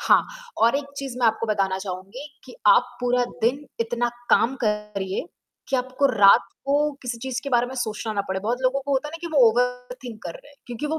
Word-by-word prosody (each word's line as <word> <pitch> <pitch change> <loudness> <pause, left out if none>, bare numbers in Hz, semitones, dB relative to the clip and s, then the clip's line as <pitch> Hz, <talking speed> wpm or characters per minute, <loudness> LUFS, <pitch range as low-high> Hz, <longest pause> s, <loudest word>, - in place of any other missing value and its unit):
हाँ, - - +4 0.3
और 230 +4 +4
एक 285 - -3
चीज़ 270 -3 -5
मैं 245 - +3
आपको 220 +1 +1
बताना 195 -3 0
चाहूँगी 190 +8 -7 0.2
कि - - -12
आप - - +5
पूरा 245 0 +2 0.2
दिन 255 +6 +1 0.2
इतना 240 +1 0 0.2
काम 245 +4 +4
करिए, 210 -2 -2 0.4
कि 270 - +1
आपको 260 +2 +1
रात 215 -3 +6 0.2
को 275 +1 +1 0.3
किसी 240 -2 -4
चीज़ 260 +1 -3
के 280 - -4
बारे 240 -1 +3
में 260 - -7
सोचना 220 -3 -3
ना 205 - 0
पड़े, 190 0 -2
बहुत 230 +5 -1
लोगों 260 +2 +2
को 280 +1 -3
होता 275 +2 0
है - - -8
ना - - -6
कि 345 - -5
वो - - +4
ओवर 250 +2 -1
थिंक 225 -3 -8
कर 170 - -5
रहे, 290 - -14
क्योंकि 245 +4 -4
वो 315 +2 -1
245 Hz, 225 wpm, -24 LUFS, 215-265 Hz, 0.4 s, रात